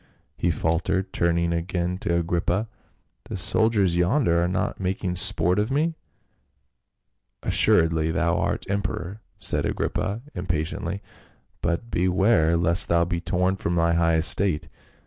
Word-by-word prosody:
he 90 - 0
faltered, 85 +4 -1
turning 85 0 +1
again 90 +1 -2
to 85 -2 -2
Agrippa. 85 +5 -1 0.3
" - - -46
The - - -4
soldiers 105 -6 +2
yonder 90 - +2
are - - +1
not 95 +2 -2
making 95 -1 -2
sport 90 +1 +3
of 105 +2 0
me 155 +5 0 0.7
?" - - -53 0.7
"Assuredly 80 -1 +2
thou 85 +1 0
art - - -2
emperor," 100 0 -3 0.2
said - - +2
Agrippa 110 +5 -2
impa 90 -3 -1
tiently, 85 +4 -5 0.6
"but 85 +7 -2
beware, 90 -2 +2
lest 85 +2 +3
thou 85 0 +3
be 85 -1 -3
torn 90 +2 0
from 85 -2 -2
thy 85 0 +2
high 85 -1 +2
estate. 85 +1 +2
90 Hz, 140 wpm, -24 LUFS, 85-95 Hz, 0.7 s, sport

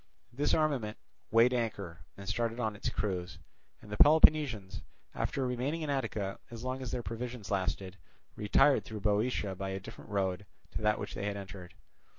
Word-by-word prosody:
This 145 +4 +2
armament 135 -9 0 0.3
weighed 115 +3 +5
anchor 100 -8 -2 0.2
and 100 -1 -9
started 115 +2 -1
on 110 -3 0
its 100 - -2
cruise, 90 -4 -2 0.5
and 105 - -12
the 105 - -3
Peloponnesians, 145 - +5 0.3
after 135 - -1
remaining 130 +6 -1
in 150 - -1
Attica 105 -8 -2
as 115 0 -8
long 130 +1 -2
as 130 - -4
their 120 - -2
provisions 115 -2 -5
lasted, 95 -1 -1 0.4
retired 120 +6 +4
through 110 -2 -7
Boeotia 105 0 +1
by 95 +1 -4
a 95 0 -3
different 95 - -11
road 100 -1 -1 0.2
to - - -4
that 105 0 +3
by - - -8
which - - -5
they 100 - -3
had 100 0 -2
entered. 95 -2 -9
110 Hz, 175 wpm, -32 LUFS, 100-125 Hz, 0.5 s, weighed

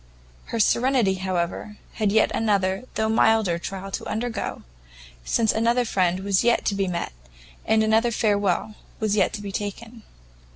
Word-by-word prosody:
Her 230 - -4
serenity, 235 -2 +3
however, 185 +2 -3 0.2
had 215 -3 0
yet 220 +1 +3
another, 200 0 0
though 220 - +1
milder 220 -5 +3
trial 195 +2 -6
to - - -4
undergo, 230 0 -3 0.6
since 220 - +2
another 235 +2 +1
friend 185 -4 +1
was 195 +1 +1
yet 240 0 +2
to - - +1
be 195 -1 -1
met, 170 - -3 0.5
and 220 0 +3
another 220 +2 +3
farewell 205 -2 0 0.3
was 215 -2 0
yet 195 -3 +2
to 210 -2 -5
be 200 - -5
taken. 220 +4 -6
210 Hz, 155 wpm, -24 LUFS, 190-225 Hz, 0.6 s, serenity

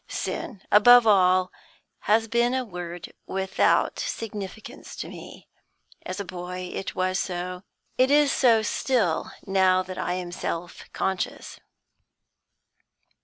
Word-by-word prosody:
Sin, 200 -6 -5
above 245 +3 +8
all, 185 -3 +4 0.6
has 225 +1 +4
been 235 +2 +1
a 260 -1 -1
word 175 -3 -8
without 190 0 +1
significance 210 -2 -6
to - - -6
me. - - -11 0.6
As 185 - -5
a 200 - -4
boy, 180 0 -6
it 195 - -5
was 185 +1 0
so; 180 0 -4 0.4
it 260 +1 +5
is 290 0 +4
so 230 -4 +4
still, 215 -7 0 0.2
now 190 -1 +3
that 185 0 -8
I 180 - -1
am 180 -1 -4
self 175 0 -5
conscious. 190 -2 -3
190 Hz, 120 wpm, -25 LUFS, 180-225 Hz, 0.6 s, above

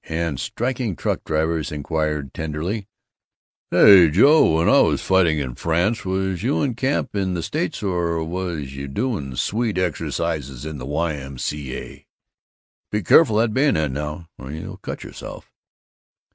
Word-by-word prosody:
and 80 -4 -2
striking 120 -4 -2
truck - - -2
drivers 80 0 -1
inquired 75 -2 -2
tenderly, 80 +7 -4 0.8
"Say, 95 -6 +8
Joe, 115 - +5
when 85 - +2
I - - +6
was - - +3
fighting 90 -4 +3
in 65 -4 -3
France, 85 - 0
was 95 -1 -2
you 135 +6 0
in 135 -4 0
camp 130 -1 -1
in 95 -2 -1
the 85 - -3
States - - -3
or 85 -4 0
was 80 -5 -4
you 70 0 -5
doing 70 - -3
Swede 110 - -1
exercises 75 -5 -2
in 80 -2 -6
the 65 - -7
Y. 80 +3 -1
M. 70 -2 -8
C. 70 0 -4
A.? - - -11 0.8
Be 105 -1 -1
careful 110 - +5
of 115 0 +3
that - - -6
bayonet, 110 - +2
now, 75 +4 -5
or 65 - -9
you'll 80 +2 -7
cut - - -7
yourself!" - - -10
85 Hz, 160 wpm, -22 LUFS, 75-100 Hz, 0.8 s, Say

